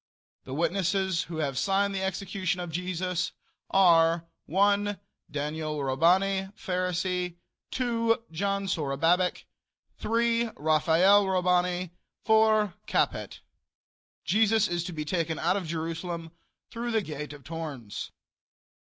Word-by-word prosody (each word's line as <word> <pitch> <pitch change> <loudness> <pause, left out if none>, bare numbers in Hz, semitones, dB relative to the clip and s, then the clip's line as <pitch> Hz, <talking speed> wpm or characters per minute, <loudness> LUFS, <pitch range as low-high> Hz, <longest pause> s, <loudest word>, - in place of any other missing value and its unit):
The 130 - -6
witnesses 190 +1 0
who 165 -1 -7
have 140 -4 -1
signed 195 +6 +1
the 190 - -2
execution 190 -1 -2
of 175 -2 -5
Jesus 180 +1 -2 0.4
are: 170 -3 +4 0.2
1. 200 +2 +2 0.3
Daniel 150 +1 -3
Robani, 190 +8 +2
Pharisee. 180 -1 -1 0.3
2. 230 -2 0
John 200 +4 -1
Zorobabic. 165 +2 +1 0.6
3. 230 +1 +1
Raphael 165 +6 +4
Robani. 180 -1 +1 0.3
4. 220 -3 +4
Capet. - - -1 0.8
Jesus 220 0 +3
is 175 -2 -1
to - - -4
be 155 -2 -4
taken 165 -1 -1
out 175 +3 +1
of 190 -4 -3
Jerusalem 165 +1 -4 0.4
through 235 +1 -4
the 225 -2 +1
gate 150 -3 -6
of 145 -2 -11
Tournes. 145 -8 -6
180 Hz, 110 wpm, -28 LUFS, 165-195 Hz, 0.8 s, are